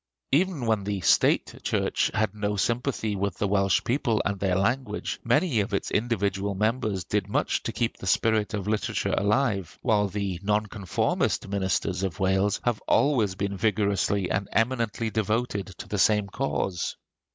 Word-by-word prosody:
Even 160 -3 +1
when 110 -3 +1
the 100 0 -2
State - - +3
church - - 0
had 110 -2 +1
no 105 -1 -2
sympathy 115 0 -1
with 100 -1 -2
the 100 - 0
Welsh 100 -1 +2
people 120 -3 +1
and 100 -1 -1
their 95 -2 +1
language, 105 +3 -1
many 140 +1 +2
of 100 +1 0
its - - -2
individual 100 -3 0
members 105 -2 0
did - - -1
much - - 0
to - - -3
keep - - -2
the - - -7
spirit 110 -1 +2
of 100 -1 -4
literature 105 0 -1
alive; 105 -4 0
while 105 -4 +3
the 100 -3 -3
nonconformist 105 -3 0
ministers 95 -1 -1
of 95 0 -3
Wales 95 +1 +2
have 120 -3 0
always 115 -10 +3
been 100 +1 -2
vigorously 100 -2 +1
and 100 +1 -1
eminently 115 -1 0
devoted 110 -1 -1
to 95 - -10
the 105 - -2
same 105 0 +4
cause. 100 - -2
105 Hz, 160 wpm, -26 LUFS, 100-115 Hz, -, same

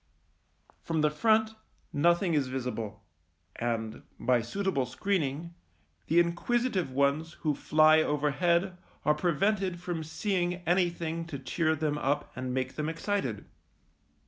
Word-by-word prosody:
From 165 -2 -1
the 150 0 +3
front 220 +7 +3 0.4
nothing 170 +4 +3
is 145 -4 +2
visible, 115 -5 -4 0.5
and, 115 -2 -2 0.2
by 120 0 +3
suitable 140 - -1
screening, 165 - -2 0.5
the 165 - +4
inquisitive 185 - +1
ones 140 +5 +1
who 155 -2 +1
fly 155 +2 +5
overhead 170 +5 +1 0.3
are 150 - +5
prevented 180 +3 0
from 175 -2 -3
seeing 175 +3 -1
anything 170 -2 0
to 150 -5 -5
cheer 160 +4 0
them 150 -1 -1
up 145 +2 -1
and 130 0 -4
make 130 0 -2
them 155 0 -1
excited. 165 - -2
160 Hz, 120 wpm, -29 LUFS, 135-175 Hz, 0.5 s, fly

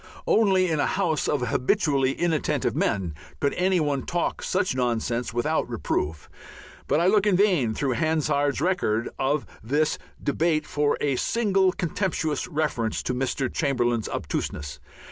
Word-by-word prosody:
Only 190 -4 +3
in 155 - 0
a - - +2
house 170 -6 0
of 145 - 0
habitually 135 - +2
inattentive 165 -2 0
men 95 -6 0 0.3
could 140 - +1
any 185 0 +2
one 145 -3 0
talk 175 +3 -2
such 185 -3 0
nonsense 120 -1 -1
without 120 +1 0
reproof, 75 0 -2 0.6
but - - +2
I 170 - +2
look 205 +2 +4
in 200 - +4
vain 175 - +2
through 135 +2 0
Hansard's 145 -1 +1
record 120 - 0
of 140 +2 0 0.2
this 145 +7 0 0.2
debate 155 +2 +1
for 145 0 0
a 140 -3 +1
single 195 - +2
contemptuous 170 -4 -2
reference 145 -8 -1
to 125 - -1
Mr. 130 +1 -1
Chamberlain's 120 -6 0
obtuseness. 70 -2 -4
145 Hz, 145 wpm, -25 LUFS, 125-180 Hz, 0.6 s, look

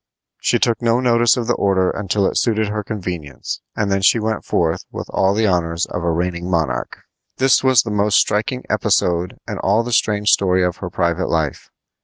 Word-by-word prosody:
She - - +2
took 115 0 0
no 115 0 +2
notice 120 -2 +3
of 120 - -2
the - - +1
order 95 -2 +1
until 100 0 -1
it - - -1
suited 110 -3 +1
her 105 0 -3
convenience, 90 -9 -6
and 105 -2 -1
then 95 0 +1
she 100 - +4
went 110 -1 -2
forth - - -1
with - - -6
all 95 +1 +1
the 110 +1 +1
honors 85 -3 0
of 90 - -5
a 85 - 0
reigning 85 +1 -2
monarch. 75 -9 -2 0.3
This 130 -1 +3
was 130 -4 +4
the 115 - -5
most 105 0 +2
striking 125 +5 0
episode 90 0 0
in - - -5
all 105 +4 +2
the 120 - -5
strange 105 -2 +1
story 95 -1 +3
of 90 -1 -1
her - - -6
private 85 +2 -1
life. 80 -4 -2
100 Hz, 200 wpm, -19 LUFS, 90-110 Hz, 0.3 s, she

